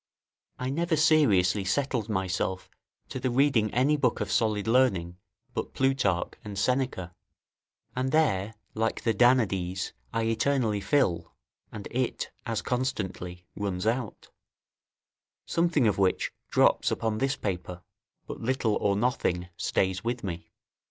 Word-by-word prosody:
I 130 0 -2
never 170 +3 +1
seriously 115 - +4
settled 115 +1 -1
myself 95 -2 -2 0.4
to - - -4
the 130 - 0
reading 125 -4 +3
any 135 +5 +3
book 125 -5 +1
of - - -2
solid 105 -3 +1
learning 95 -9 +2 0.4
but - - -4
Plutarch 130 -10 +1
and 105 -2 -7
Seneca; 110 -5 0 0.8
and 130 +1 -1
there, 110 -10 +2 0.2
like 115 +1 -1
the 115 - +2
Danaides, 100 -6 +2 0.2
I 115 - 0
eternally 115 -1 +1
fill, 95 - +1 0.4
and 105 -2 -7
it 125 0 -2 0.2
as 115 -2 -2
constantly 95 -8 -3
runs 95 -2 -3
out; 115 0 -2 1.2
something 165 -6 +2
of 105 - +1
which 95 -2 +1 0.2
drops - - +3
upon 110 -1 -1
this 135 +2 +1
paper, 90 -2 -4 0.4
but - - -7
little 115 -3 +1
or 100 -1 +1
nothing 95 -6 0
stays 95 -1 0
with 120 +1 -2
me. 85 -4 -6
110 Hz, 130 wpm, -28 LUFS, 95-130 Hz, 1.2 s, seriously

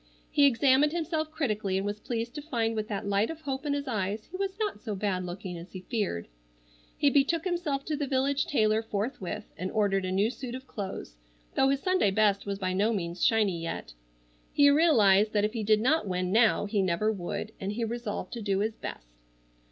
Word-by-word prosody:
He 285 -1 +6
examined 275 +3 +4
himself 315 -2 -1
critically, 215 -11 -1
and 195 - -1
was 205 +1 -3
pleased 235 +1 -3
to 295 - -5
find 230 -7 -1
with 215 -1 -2
that 205 -2 -3
light 200 +2 +1
of 325 -1 -6
hope 275 0 -4
in 285 - +1
his 285 0 -3
eyes 210 -2 -2
he - - -7
was 385 0 -2
not 420 - -2
so 215 -1 -4
bad 190 -2 -1
looking 180 -1 -6
as 170 - -12
he 185 - -6
feared. 195 - -2 0.7
He 285 - +3
betook 295 +4 +2
himself 340 -6 -1
to 310 - -1
the 290 -1 -2
village 275 +1 +1
tailor 215 -5 +2
forthwith 210 -1 -3 0.2
and 185 - -2
ordered 200 -3 +1
a 185 - -2
new 200 +4 +2
suit 255 -2 -6
of 260 +1 -8
clothes, 190 - -6 0.4
though 270 - +3
his 275 0 +1
Sunday 370 - +3
best 200 0 +2
was 200 -1 -2
by 185 -2 -1
no 205 +4 +2
means 175 -4 -3
shiny 205 -7 +3
yet. 165 - -5 0.6
He 285 0 +6
realized 215 - +5
that 205 -1 +3
if 215 - -2
he 230 - -2
did 215 0 +3
not 280 0 +2
win 180 -1 -1
now 225 0 +4
he 205 -1 0
never 190 +4 +1
would, 205 +2 -4
and 195 +1 -3
he 230 +2 -2
resolved 230 -2 -4
to 235 - -5
do 200 -2 0
his 215 +3 0
best. - - -9
215 Hz, 215 wpm, -29 LUFS, 195-275 Hz, 0.7 s, He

